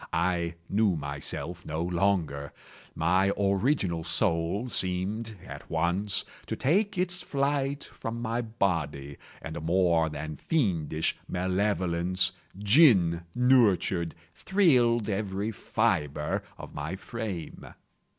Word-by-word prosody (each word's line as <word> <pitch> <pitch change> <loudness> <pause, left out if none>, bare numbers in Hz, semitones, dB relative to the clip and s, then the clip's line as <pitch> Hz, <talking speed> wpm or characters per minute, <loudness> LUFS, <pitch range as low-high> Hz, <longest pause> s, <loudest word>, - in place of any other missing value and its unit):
I 85 0 0
knew 100 -2 +2
myself 75 +4 -4
no 80 +2 -3
longer. 85 -6 0 0.4
My 95 +4 +2
original 100 - +1
soul 85 +4 +1
seemed, 105 +2 -1
at - - -10
once, 90 +5 0 0.2
to - - -2
take 200 +8 +1
its 180 0 0
flight 140 -2 -1
from 115 +1 -6
my 120 0 -1
body 80 - -2 0.3
and 80 0 -6
a 85 - -5
more 85 -1 +2
than 75 0 -6
fiendish 85 - 0
malevolence, 90 -1 +1 0.3
gin 100 - +5
nurtured, 105 -9 +3 0.2
thrilled 125 - +3
every 100 0 -2
fibre 80 -10 0 0.2
of - - -10
my 75 +5 -4
frame. 100 -5 -6
95 Hz, 105 wpm, -28 LUFS, 85-115 Hz, 0.4 s, gin